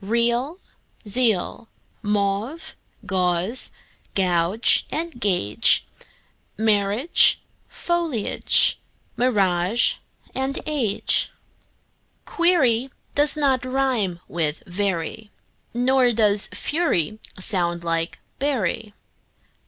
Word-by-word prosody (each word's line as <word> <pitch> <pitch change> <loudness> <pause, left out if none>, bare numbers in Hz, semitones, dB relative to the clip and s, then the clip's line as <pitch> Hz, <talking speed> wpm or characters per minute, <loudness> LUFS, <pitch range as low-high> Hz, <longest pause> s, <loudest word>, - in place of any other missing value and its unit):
Real, 235 - 0 0.5
zeal; 225 -1 0 0.3
mauve, 210 +8 -2 0.3
gauze 185 +4 0 0.4
and 195 - +1
gauge; 175 - +2 0.7
Marriage, 215 +7 +3 0.3
foliage, 335 -10 +1 0.4
mirage, 200 -3 +2 0.7
age. 250 -10 0 0.9
Query 270 -8 +2 0.2
does 295 +1 +3
not 270 -4 +2
rime 255 -9 0
with 160 +3 -2
very, 190 +1 -3 0.4
Nor 250 0 +2
does 210 -2 +3
fury 215 - -1 0.2
sound 175 -3 -2
like 165 0 -2 0.2
bury. 225 -6 -1
220 Hz, 65 wpm, -23 LUFS, 185-260 Hz, 0.9 s, Marriage